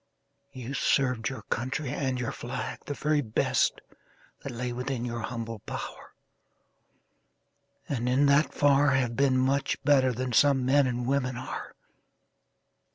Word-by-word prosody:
You 130 -1 -7
served 125 -5 +1
your 135 - -7
country 130 +3 -3
and 130 -3 -1
your 125 - -2
flag 125 +1 -5
The 145 - -3
very 150 0 +1
best 110 -5 +1 0.6
That 140 - -6
lay 120 +1 -4
within 125 0 -3
your 120 -1 -3
humble 115 -1 -5
power, - - -8 1.7
And 125 -3 -1
in 135 +3 +3
that 140 +2 +4
far 145 -1 +4
Have 125 -3 0
been 135 -1 +3
much 135 +2 +1
better 135 -3 +4
than 125 +1 -3
some 135 +1 +4
men 140 +1 +4
And 120 -1 -2
women 130 -1 0
are. 130 +1 -6
130 Hz, 140 wpm, -28 LUFS, 125-140 Hz, 1.7 s, that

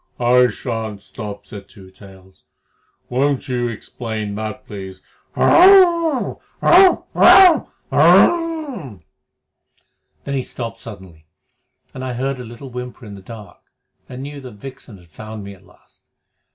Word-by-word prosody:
"I 125 +1 +4
shan't 110 -3 -5
stop," 105 -2 -9
said 100 -1 -11
Two 95 -2 -16
Tails. 95 -1 -18 0.6
"Won't 135 +2 -1
you 125 -2 -2
explain 110 -2 -6
that, 110 +1 -6
please? 95 -2 -9 0.4
Hhrrmph! 345 -6 +4 0.2
Rrrt! 370 +1 +5
Rrrmph! 365 -4 +6 0.2
Rrrhha!" 295 - +2 1.2
Then 140 - -5
he 135 - -1
stopped 115 -2 -7
suddenly, 95 -9 -13 0.7
and 130 - -8
I 130 -1 -4
heard 130 +2 -3
a - - -7
little 120 +3 -11
whimper 125 0 -8
in 105 - -10
the 100 - -11
dark, 105 -1 -12 0.5
and 130 +1 -8
knew 145 0 -8
that 125 -3 -11
Vixen 120 -1 -11
had 90 - -19
found 110 +4 -9
me 100 0 -9
at 95 0 -20
last. - - -25
120 Hz, 135 wpm, -19 LUFS, 100-135 Hz, 1.2 s, Rrrmph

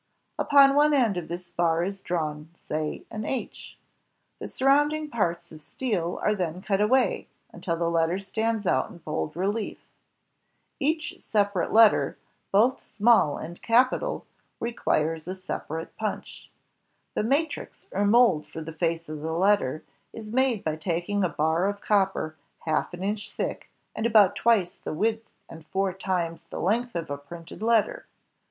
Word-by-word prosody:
Upon 275 -1 +6
one 295 +1 +4
end 235 -7 +3
of 175 -3 -4
this 175 0 -7
bar 170 -1 +1
is 195 +1 -4
drawn, 155 -3 -3
say, 155 -2 -4
an 215 - -4
H. 255 +3 -5 0.6
The - - -5
surrounding 295 +3 +2
parts 175 -6 -1
of 155 -1 -12
steel 180 -3 -2
are 210 - +3
then 180 -4 -3
cut 195 0 0
away 255 +5 +2 0.2
until 170 -3 -3
the 170 0 -1
letter 165 +1 +1
stands 220 +2 -2
out 130 -7 +1
in - - -12
bold 155 -2 -4
relief. 205 +5 -2 1.0
Each 310 +2 -1
separate 200 -4 0
letter, 225 -1 +5 0.3
both 225 +6 +4
small 215 -9 +3
and 170 +2 -8
capital, 255 - +2 0.3
requires 165 -9 -1
1 185 - -3
separate 165 -3 -6
punch. 215 -1 -5 0.6
The - - 0
matrix, 285 +6 -1
or 200 - 0
mold 205 -8 +4
for 160 - -7
the 160 +1 -7
face 165 0 -1
of 155 -1 -6
the 160 +1 -3
letter, 180 -5 +2 0.3
is 215 -1 -8
made 260 -4 +2
by 155 -1 -1
taking 175 +4 -1
a 180 - +2
bar 160 +4 +1
of 200 0 -2
copper 195 -7 +1 0.3
half 155 -1 -1
an 180 - -7
inch 205 +1 -3
thick, - - -4 0.3
and 220 - 0
about 210 -4 +5
twice 215 -7 +2
the - - -6
width 225 +6 -1 0.2
and 165 -1 -11
four 195 -1 0
times 180 -3 -2
the - - -6
length 235 +5 0
of 165 -3 -3
a 145 - -3
printed 165 +6 -11
letter. 225 -2 +1
195 Hz, 160 wpm, -26 LUFS, 165-225 Hz, 1.0 s, Upon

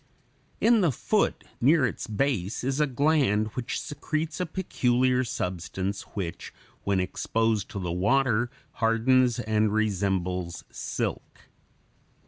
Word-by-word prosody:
In 230 -1 +5
the 170 -5 +3
foot, - - 0 0.2
near 145 +2 +5
its 120 - -3
base, 110 -4 -1
is 135 +2 -1
a 150 - +3
gland 130 -6 +2
which 125 +2 -3
secretes 155 +3 -3
a 180 - -1
peculiar 130 -7 +1
substance, 95 -1 -3
which 90 -5 -4 0.3
when 100 -1 +1
exposed 110 +3 0
to 100 - -5
the 90 -2 -3
water 120 +5 +2 0.2
hardens 120 +2 +3
and 110 0 +1
resembles 95 -4 -1
silk. - - -4
115 Hz, 115 wpm, -27 LUFS, 100-135 Hz, 0.3 s, In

